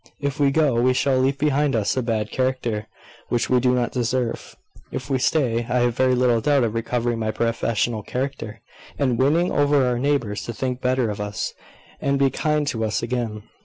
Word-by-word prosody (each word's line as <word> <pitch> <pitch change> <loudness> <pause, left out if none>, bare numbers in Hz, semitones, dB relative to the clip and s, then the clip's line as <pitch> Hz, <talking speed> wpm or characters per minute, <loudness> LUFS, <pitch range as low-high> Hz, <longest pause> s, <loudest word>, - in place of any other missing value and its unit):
If 140 0 -3
we 140 -1 +4
go, 135 -5 +2
we 130 +1 +3
shall 130 0 +2
leave 135 +1 +1
behind 145 -2 +1
us 110 -3 +1
a 130 - +1
bad 110 -3 -2
character, 130 -5 -1 0.4
which 120 +1 0
we 125 - +5
do 125 0 +2
not 120 -1 0
deserve. 125 -1 -2 0.4
If - - -5
we 130 - +2
stay, 125 -5 +1
I 125 0 +2
have 120 -1 +1
very 130 0 +3
little 120 -2 +2
doubt 145 -1 +3
of 110 -2 0
recovering 120 0 -1
my 110 -1 -1
professional 115 0 -1
character, 120 -2 -4 0.4
and 130 -5 +1
winning 160 +7 +3
over 145 -2 +3
our 125 -1 0
neighbours 130 -7 0
to 120 - -5
think 125 +2 -3
better 125 -3 +1
of 105 - -5
us, 105 0 -3 0.5
and 140 0 +1
be 135 -1 +3
kind 150 -1 0
to 115 -1 -2
us 110 +1 -1
again. 115 -3 -3
125 Hz, 200 wpm, -23 LUFS, 115-135 Hz, 0.5 s, we